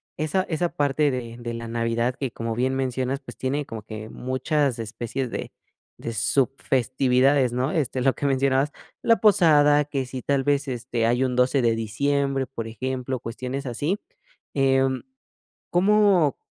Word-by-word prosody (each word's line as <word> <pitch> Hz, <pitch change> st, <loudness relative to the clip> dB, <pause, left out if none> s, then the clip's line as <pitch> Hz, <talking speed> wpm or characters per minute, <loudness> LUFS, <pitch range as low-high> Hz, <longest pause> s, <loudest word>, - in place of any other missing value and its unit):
esa 155 Hz, +5 st, 0 dB
esa 170 Hz, +1 st, 0 dB
parte 145 Hz, 0 st, +1 dB
de 120 Hz, -3 st, -5 dB
de 120 Hz, -1 st, -5 dB
la 115 Hz, 0 st, -6 dB
Navidad 115 Hz, +2 st, 0 dB
que, 135 Hz, -4 st, -3 dB
como 115 Hz, -1 st, -4 dB
bien 130 Hz, +3 st, 0 dB
mencionas, 130 Hz, 0 st, -1 dB
pues, 135 Hz, -, -11 dB
tiene 140 Hz, +2 st, -2 dB
como 110 Hz, -1 st, -7 dB
que 110 Hz, 0 st, -7 dB
muchas 130 Hz, 0 st, -1 dB
especies 120 Hz, +3 st, -4 dB
de -, -, -5 dB, 0.5 s
de 115 Hz, -, -5 dB
sub 125 Hz, +4 st, +2 dB
festividades, 130 Hz, +1 st, +2 dB
¿no?, 130 Hz, +4 st, 0 dB
este, 135 Hz, -5 st, -1 dB
lo 135 Hz, 0 st, +3 dB
que -, -, -4 dB
mencionabas, 135 Hz, +1 st, +2 dB, 0.3 s
la 230 Hz, -1 st, +5 dB
posada, 150 Hz, -8 st, +5 dB
que 140 Hz, -2 st, -2 dB
si 130 Hz, 0 st, -6 dB
tal 140 Hz, -1 st, +1 dB
vez, 145 Hz, 0 st, +1 dB
este, 120 Hz, -2 st, -2 dB
hay 120 Hz, +3 st, +2 dB
un 125 Hz, -1 st, -1 dB
12 125 Hz, +2 st, +3 dB
de 115 Hz, -2 st, +2 dB
diciembre, 135 Hz, +4 st, 0 dB
por 115 Hz, -4 st, -6 dB
ejemplo, 130 Hz, +2 st, -3 dB
cuestiones 125 Hz, +4 st, -5 dB
así, 150 Hz, -, -1 dB, 0.6 s
em, 135 Hz, -1 st, +2 dB, 0.7 s
¿cómo 190 Hz, -5 st, +4 dB
130 Hz, 160 wpm, -24 LUFS, 120-145 Hz, 0.7 s, la